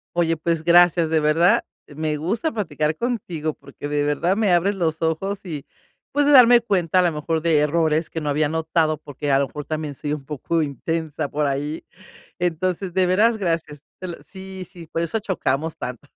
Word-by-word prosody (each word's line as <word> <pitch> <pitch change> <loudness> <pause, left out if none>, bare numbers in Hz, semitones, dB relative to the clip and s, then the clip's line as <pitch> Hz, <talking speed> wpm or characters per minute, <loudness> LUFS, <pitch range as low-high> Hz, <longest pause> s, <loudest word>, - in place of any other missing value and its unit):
Oye, 165 -1 +2
pues 160 0 -1
gracias, 175 -1 +5
de 160 -1 +2
verdad, 170 +9 +3 0.2
me 150 0 -3
gusta 220 - -1
platicar 160 - -2
contigo, 180 -11 -2
porque 140 +1 -9
de 145 0 0
verdad 150 +6 +1
me 215 -3 +2
abres 180 +4 +3
los 165 -4 -1
ojos 180 +5 -1
y, 150 -5 -6 0.5
pues 290 +1 +2
de 290 - +4
darme 245 -2 +8
cuenta 185 -6 +1
a - - +6
lo 175 -2 +1
mejor 160 +2 -1
de 160 -2 +3
errores 155 +1 +1
que 160 - -4
no 150 - -5
había 145 +1 +1
notado, 160 -1 0
porque 145 -1 -4
a 135 - +4
lo 140 - +1
mejor 150 - -7
también 155 -2 -4
soy 145 +2 -4
un 150 -2 -4
poco 155 +3 -1
intensa 155 +1 -3
por 150 0 -1
ahí. 145 +3 -3 0.5
Entonces, 180 +1 -1
de 185 -1 +3
veras, 220 +5 +3
gracias. 165 -6 -2 0.2
Te 185 - -6
lo 170 - -6
sí, 190 -1 -9
sí, 175 -3 -11
por 165 - -2
eso 170 +6 -1
chocamos 160 -6 -2
tanto. 125 +3 -7
160 Hz, 195 wpm, -22 LUFS, 150-185 Hz, 0.5 s, darme